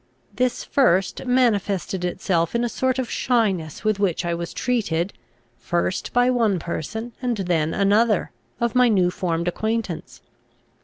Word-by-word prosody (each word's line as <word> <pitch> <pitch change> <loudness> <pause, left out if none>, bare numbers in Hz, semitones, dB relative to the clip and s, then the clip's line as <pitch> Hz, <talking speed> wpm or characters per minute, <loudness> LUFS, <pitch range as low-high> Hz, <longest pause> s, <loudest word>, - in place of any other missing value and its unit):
This 255 -1 0
first 195 -4 +1
manifested 205 -7 +1
itself 175 0 0
in 235 - +1
a 240 - 0
sort 260 +2 0
of 260 -2 -1
shyness 195 - 0
with 215 -2 +1
which 185 -3 0
I 170 - 0
was 170 0 -4
treated, 200 -8 -1 0.5
first 175 +2 -1
by 245 +1 +3
one 225 -6 +2
person, 220 +8 -5
and 245 -3 -1
then 170 -5 0
another, 210 +2 +2 0.3
of 235 -1 0
my 250 -1 +5
new 185 -5 +3
formed 170 -2 -2
acquaintance. 220 -1 -3
200 Hz, 145 wpm, -23 LUFS, 175-240 Hz, 0.5 s, my